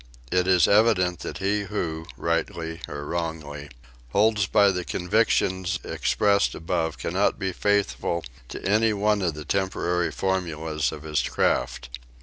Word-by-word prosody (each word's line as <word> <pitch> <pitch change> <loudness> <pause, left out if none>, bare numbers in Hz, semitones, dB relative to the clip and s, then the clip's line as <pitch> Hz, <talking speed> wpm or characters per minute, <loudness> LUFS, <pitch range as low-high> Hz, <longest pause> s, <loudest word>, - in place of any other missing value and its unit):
It 90 0 +2
is 90 -3 +5
evident 100 -5 +3
that - - -6
he 100 +1 0
who, 80 -6 -3
rightly 85 0 -2
or 75 0 -6
wrongly, 75 -3 -4 0.4
holds 105 -1 +3
by 100 -1 +5
the 90 -1 -3
convictions 95 -1 +1
expressed 100 -2 +1
above 80 -1 -2
cannot - - 0
be 95 -1 -2
faithful 100 -4 0 0.3
to - - -7
any 110 +2 +3
one 105 0 +1
of 85 -5 0
the 75 -1 -7
temporary 90 -1 0
formulas 80 -5 -1
of 75 -1 -8
his 75 -1 0
craft. - - -1
90 Hz, 135 wpm, -25 LUFS, 80-100 Hz, 0.4 s, is